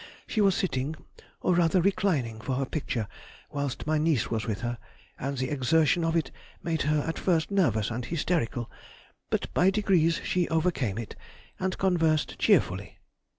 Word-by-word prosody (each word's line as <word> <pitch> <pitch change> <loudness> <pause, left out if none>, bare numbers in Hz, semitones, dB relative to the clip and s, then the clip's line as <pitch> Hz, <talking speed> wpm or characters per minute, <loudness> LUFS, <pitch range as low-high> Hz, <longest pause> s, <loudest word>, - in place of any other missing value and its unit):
She 215 - 0
was 195 -3 +4
sitting—or 155 0 -3
rather 175 +1 +3
reclining—for 140 - 0
her 135 +1 0
picture 125 -6 -3 0.4
whilst 140 -3 -3
my 155 0 +1
niece 155 -7 +1
was 115 0 -1
with 105 -3 -2
her, 120 0 -3 0.4
and 140 +1 -3
the 130 0 -2
exertion 155 +5 +3
of 165 0 +1
it 165 - 0 0.3
made 165 -2 -1
her 150 0 +1
at 165 - -2
first 170 -1 +1
nervous 120 - +2
and 120 +2 -3
hysterical, 145 -5 -1 0.6
but - - -2
by 180 - +4
degrees 190 -5 +2
she 180 -1 0
overcame 160 - 0
it, 115 -2 -6 0.4
and 185 0 -1
conversed 165 -5 +1
cheerfully. - - +2
155 Hz, 150 wpm, -28 LUFS, 125-175 Hz, 0.6 s, was